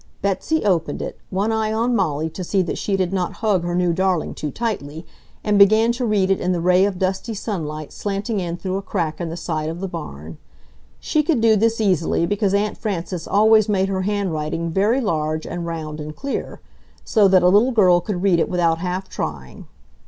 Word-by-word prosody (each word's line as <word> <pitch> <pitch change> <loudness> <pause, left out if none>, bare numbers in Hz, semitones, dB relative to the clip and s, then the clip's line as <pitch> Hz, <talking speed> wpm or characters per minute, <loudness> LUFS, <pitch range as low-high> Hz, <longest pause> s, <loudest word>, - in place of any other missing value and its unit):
Betsy 200 +10 0
opened 175 -5 +1
it, - - -6
one 200 +4 0
eye 220 -1 0
on 235 +3 +1
Molly 160 -6 0
to 185 - -6
see 190 +2 +1
that 170 - -4
she 195 -2 -1
did 185 -1 -1
not 180 -2 -1
hug 195 -5 +2
her 175 0 -2
new 180 -1 +2
darling 185 -1 0
too 150 - -4
tightly, 160 - -4 0.4
and 210 -1 +2
began 215 +3 +6
to 245 +1 -2
read 195 -3 +2
it 195 - +1
in 180 - +1
the 175 - -1
ray 180 +2 +4
of 200 -2 -2
dusty 190 +4 -2
sunlight 155 -8 -5
slanting 205 +2 -2
in 175 -2 -3
through 190 +1 -3
a - - -3
crack 175 -5 -3
in 170 - -3
the 165 - -5
side 155 -3 -3
of 165 +2 -5
the 195 - -3
barn. 80 - -8 0.6
She 310 - +1
could 300 -4 +1
do 225 -1 +4
this 225 +2 +1
easily, 180 -5 +1
because 200 +1 0
Aunt 205 +1 -1
Frances 180 -5 -4
always 215 +1 +4
made 195 -1 +1
her 190 -1 -1
handwriting 170 -5 -2
very 210 +9 +2
large 155 -6 -1
and 170 0 -5
round 155 -2 -5
and 150 0 -7
clear, 275 0 -5 0.4
so 210 -3 +4
that 185 -2 +4
a - - +6
little 210 +7 +4
girl 185 -7 +5
could 185 -1 -4
read 185 -4 +3
it - - +1
without 170 -2 +1
half 180 +2 -3
trying. 70 -4 -6
190 Hz, 210 wpm, -21 LUFS, 170-210 Hz, 0.6 s, began